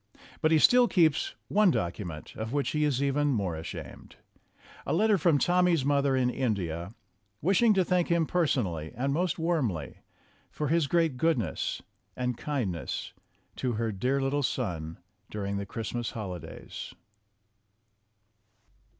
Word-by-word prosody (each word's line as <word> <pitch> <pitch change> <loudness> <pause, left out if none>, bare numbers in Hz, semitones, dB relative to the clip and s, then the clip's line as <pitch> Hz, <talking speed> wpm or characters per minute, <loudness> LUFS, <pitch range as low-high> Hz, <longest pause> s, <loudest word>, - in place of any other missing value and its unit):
But 155 - +3
he 160 - +6
still 245 +9 +6
keeps 170 - +2
one 210 -1 +4
document 85 - -3
of 110 +1 -4
which 145 0 0
he 150 0 +1
is 140 -2 +1
even 145 +1 +1
more 100 - 0
ashamed 80 +1 -8 0.7
a - - -2
letter 210 +5 +4
from 165 -4 +3
Tommy's 175 -2 +3
mother 140 -1 +2
in 125 -1 +2
In 125 -4 0
dia, 85 +2 -5 0.4
wishing 195 - +4
to 190 -2 +3
thank 180 -1 +2
him 170 -1 +2
personally 115 - 0
and 135 +4 0
most 175 +2 0
warmly 135 - -1 0.5
for 150 -2 -3
his 165 -2 +2
great 165 -4 +1
goodness 140 - 0 0.3
and 125 -1 -1
kindness 115 - -3 0.4
to 125 -2 -1
her 115 0 -1
dear 125 +8 0
little 135 +2 0
son 85 - -2 0.3
during 100 -1 -3
the 100 0 -4
Christmas 115 +2 -3
holidays. 95 -7 -7
135 Hz, 140 wpm, -29 LUFS, 105-165 Hz, 0.7 s, he